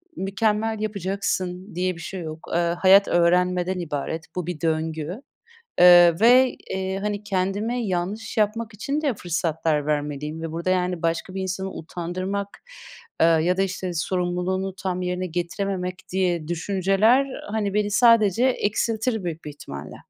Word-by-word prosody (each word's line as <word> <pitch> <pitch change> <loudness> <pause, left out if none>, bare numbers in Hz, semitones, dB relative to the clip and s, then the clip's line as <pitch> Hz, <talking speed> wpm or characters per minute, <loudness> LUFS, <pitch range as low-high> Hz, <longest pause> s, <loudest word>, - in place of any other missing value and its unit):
mükemmel 215 +2 0
yapacaksın 190 -2 -3
diye 185 +1 -1
bir 165 - -10
şey 190 0 -6
yok. 155 0 -8
Eee, - - +3 0.2
hayat 195 +1 +6
öğrenmeden 180 +1 +2
ibaret. 160 0 -4
Bu 180 -2 -3
bir 175 -4 -5
döngü, 160 - -2 0.6
ııı, 175 -1 +8
ve, 250 +2 +6 0.2
eee, 190 0 -2
hani, 205 0 -3
kendime 205 +4 -1
yanlış 195 +5 -3
yapmak 220 +2 0
için 280 +8 -2
de 285 -5 +1
fırsatlar 160 -4 -1
vermeliyim 150 +1 -2
ve 165 -1 -4
burada 170 +3 -3
yani 180 -2 0
başka 165 +2 -1
bir 190 - -2
insanı 190 +1 -3
utandırmak, 185 +4 -4 0.7
ııı, 165 -1 +5
ya 180 +3 +1
da - - +2
işte 185 -1 -2
sorumluluğunu 180 +2 -1
tam 185 -1 -3
yerine 180 0 -2
getirememek 180 +2 -3 0.2
diye 180 -4 0
düşünceler, 195 +7 +2
ııı, 260 -6 -8
hani 210 -2 -1
beni 210 0 0
sadece 230 0 +4
eksiltir 220 -1 0
büyük 165 -2 -5
bir - - -5
ihtimalle. 75 - -9
185 Hz, 145 wpm, -24 LUFS, 170-205 Hz, 0.7 s, ııı